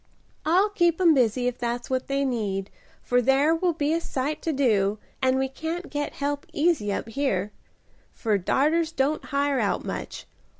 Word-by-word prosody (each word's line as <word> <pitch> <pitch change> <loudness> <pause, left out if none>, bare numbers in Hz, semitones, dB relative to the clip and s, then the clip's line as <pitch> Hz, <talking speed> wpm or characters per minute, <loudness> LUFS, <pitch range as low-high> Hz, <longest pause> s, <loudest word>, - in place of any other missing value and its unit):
"I'll 370 +6 +4
keep 345 -4 +2
'em 345 -3 +6
busy 245 -2 +2
if 250 0 -1
that's 240 0 -2
what 260 0 -2
they 275 0 0
need, 205 -6 -2 0.3
for 245 0 +2
there 270 +5 +3
will 345 +1 +1
be 300 0 0
a 335 - 0
sight 285 0 -3
to 325 - -1
do, 215 -8 +2 0.2
and 260 0 +3
we 265 0 +1
can't 320 +6 -5
get 290 0 -3
help 285 0 -3
easy 295 -10 +1
up 200 - -3
here. 225 -6 -1 0.7
Our 210 -3 +3
darters 315 - +1
don't 290 +1 0
hire 280 -1 0
out 205 -3 0
much. - - -5
275 Hz, 175 wpm, -25 LUFS, 240-315 Hz, 0.7 s, em